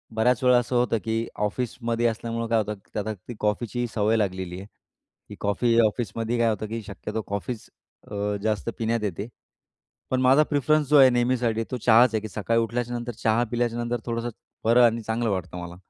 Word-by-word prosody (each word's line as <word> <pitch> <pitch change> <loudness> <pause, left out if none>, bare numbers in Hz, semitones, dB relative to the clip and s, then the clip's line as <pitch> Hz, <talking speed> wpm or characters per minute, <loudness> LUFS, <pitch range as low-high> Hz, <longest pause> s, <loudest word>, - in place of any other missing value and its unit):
बऱ्याच 120 +2 +2
वेळा 125 -1 +6
असं 120 +1 -1
होतं 120 -1 +2
की 115 +1 -1 0.2
ऑफिसमध्ये 120 +1 -2
असल्यामुळं 115 +1 -3
काय 115 0 +2
होतं, 105 0 -2 0.2
त्यात 105 0 -3
आता 110 - -1
ती 120 - -5
कॉफीची 120 +3 -1
सवय 110 0 +2
लागलेली 95 -3 -2
आहे 95 - -9 0.6
की, - - -8
कॉफी 115 +3 +1
ऑफिसमध्ये 115 +1 -2
काय 115 -1 +3
होतं 110 0 -2
की, 115 +1 -4
शक्यतो 105 +2 -5
कॉफीच 105 +3 -4 0.4
अ, 105 0 -1
जास्त 105 - -1
पिण्यात 115 -1 -1
येते, 100 +1 -3 0.8
पण 130 0 +1
माझा 130 +4 +6
प्रीफरन्स 150 +1 +2
जो 150 - +6
आहे 130 - +9
नेहमीसाठी 120 -2 +1
तो 125 - -1
चहाच 115 +1 +5
आहे 110 - 0
की, 110 - -5
सकाळी 115 +3 0
उठल्याच्या 120 +1 -2
नंतर 120 0 -4
चहा 110 +2 +3
पिल्याच्या 120 -1 0
नंतर 120 0 -2
थोडंसं 115 0 -2 0.4
बरं 120 +2 +6
आणि 115 0 +2
चांगलं 115 +1 -1
वाटतं 95 -2 -3
मला. 85 0 -8
115 Hz, 190 wpm, -25 LUFS, 105-120 Hz, 0.8 s, आहे